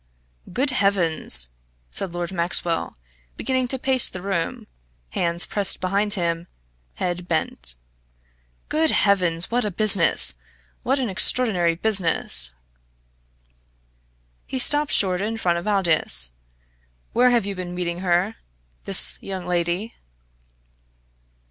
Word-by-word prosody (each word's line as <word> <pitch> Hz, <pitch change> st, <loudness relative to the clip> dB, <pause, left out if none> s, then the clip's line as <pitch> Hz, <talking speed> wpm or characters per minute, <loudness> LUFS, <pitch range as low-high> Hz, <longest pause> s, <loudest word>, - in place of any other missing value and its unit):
"Good 265 Hz, +9 st, 0 dB
heavens!" 170 Hz, -, +1 dB, 0.4 s
said 195 Hz, -3 st, -4 dB
Lord 175 Hz, 0 st, -5 dB
Maxwell, 170 Hz, -, 0 dB, 0.4 s
beginning 260 Hz, -1 st, -2 dB
to 265 Hz, -, -4 dB
pace 260 Hz, -1 st, +2 dB
the 180 Hz, -1 st, -9 dB
room, 190 Hz, -4 st, -4 dB, 0.5 s
hands 170 Hz, -, +1 dB
pressed 200 Hz, -2 st, -2 dB
behind 200 Hz, +3 st, +1 dB
him, 170 Hz, -2 st, -3 dB, 0.5 s
head 175 Hz, 0 st, -4 dB
bent. 155 Hz, -, -3 dB, 0.9 s
"Good 315 Hz, +1 st, +1 dB
heavens! 180 Hz, -, +2 dB
what 245 Hz, +1 st, 0 dB
a 210 Hz, -, -2 dB
business! 195 Hz, -, +5 dB, 0.5 s
what 270 Hz, +3 st, -1 dB
an 260 Hz, -3 st, -2 dB
extraordinary 190 Hz, -4 st, +3 dB
business!" 165 Hz, -, +3 dB, 1.9 s
He 265 Hz, -, -5 dB
stopped 290 Hz, +3 st, +1 dB
short 185 Hz, -2 st, +2 dB
in 220 Hz, +2 st, -3 dB
front 175 Hz, -5 st, -1 dB
of 175 Hz, -, -9 dB
Aldous. 160 Hz, -, +2 dB, 0.8 s
"Where 250 Hz, +2 st, +3 dB
have 240 Hz, -4 st, +1 dB
you 200 Hz, -, -4 dB
been 180 Hz, -1 st, -7 dB
meeting 175 Hz, -1 st, -4 dB
her 185 Hz, +4 st, -1 dB, 0.5 s
this -, -, +3 dB
young 190 Hz, -2 st, -7 dB
lady?" 175 Hz, +5 st, -3 dB
185 Hz, 115 wpm, -21 LUFS, 170-215 Hz, 1.9 s, business